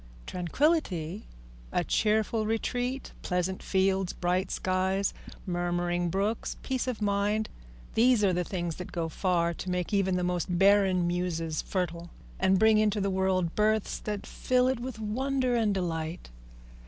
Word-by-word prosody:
Tranquillity, 185 - 0 0.4
a - - +1
cheerful 215 0 +1
retreat, 245 +4 -2
pleasant 180 +1 -1
fields, 190 -1 +1
bright 180 +2 0
skies, 190 +1 0 0.3
murmuring 175 -1 0
brooks, 200 +5 -1
peace 260 -1 -1
of 230 -4 -2
mind, 205 +2 +1 0.4
these 235 -1 +4
are 190 -2 +4
the 180 0 +1
things 175 -2 -3
that 180 - -7
go 165 -1 -2
far 170 0 +1
to 185 - -6
make 180 +2 -2
even 190 -2 +2
the 180 - 0
most 180 0 -1
barren 195 -2 +4
muses 170 -3 -1
fertile, 175 -2 -3 0.3
and 190 0 +4
bring 220 +1 +5
into 210 -1 +2
the 195 0 0
world 185 -2 +1
births 215 0 +1
that 210 -2 -4
fill 250 0 +1
it 260 -2 0
with 250 -1 -5
wonder 255 +4 0
and 215 -4 +2
delight. 165 - -3
190 Hz, 145 wpm, -29 LUFS, 175-215 Hz, 0.4 s, bring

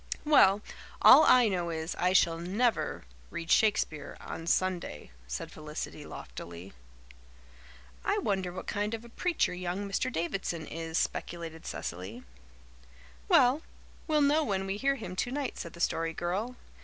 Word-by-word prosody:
"Well, 210 -10 +6 0.4
all - - +10
I 250 -2 +6
know 180 -4 -1
is, 160 0 -3
I 180 +1 +3
shall 170 -3 +3
never 210 +8 0 0.3
read 165 - -5
Shakespeare 205 -8 +2
on 165 - -7
Sunday," 180 - -1 0.2
said 60 0 -5
Felicity - - -7
loftily. 85 +3 -9 1.3
"I - - +1
wonder 190 -3 -1
what 180 - -7
kind 210 +2 -1
of 225 +1 -10
a - - -12
preacher 345 - 0
young 180 +3 -3
Mr. 200 +6 -1
Davidson 170 -3 -2
is," 165 +1 -4
speculated 165 -2 -3
Cecily. 95 +8 -6 1.0
"Well, 255 +5 +5 0.5
we'll 305 -2 +3
know 295 +2 +4
when 195 -6 -1
we 195 +1 -2
hear 275 +5 +2
him 185 -8 -7
tonight," 260 +6 -2
said 170 - -6
the 170 - -12
Story 165 -1 0
Girl. 195 +10 -2
185 Hz, 145 wpm, -30 LUFS, 165-225 Hz, 1.3 s, all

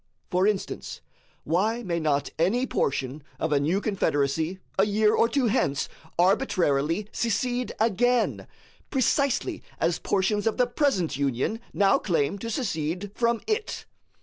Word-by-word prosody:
For 185 +2 +3
instance, 210 -3 -3 0.4
why 215 +9 0
may 170 -4 -1
not 145 -3 0
any 215 +10 +2
portion 135 - -1 0.2
of 160 - -1
a 145 - +4
new 160 +7 +1
confederacy 160 -4 0 0.2
a 195 - +5
year 215 +1 +3
or 230 - +3
two 275 -1 +1
hence 145 -10 +1 0.3
arbitrarily 175 - +2
secede 245 +2 -1
again, 235 +2 +1 0.4
precisely 280 +4 +1 0.2
as 165 0 +1
portions 205 +2 0
of 225 - 0
the 250 - +4
present 240 - 0
Union 140 - -1
now 195 -1 +3
claim 165 0 0
to 230 - -5
secede 185 - -2
from 235 0 +1
it? 435 0 -2
200 Hz, 135 wpm, -26 LUFS, 160-235 Hz, 0.4 s, a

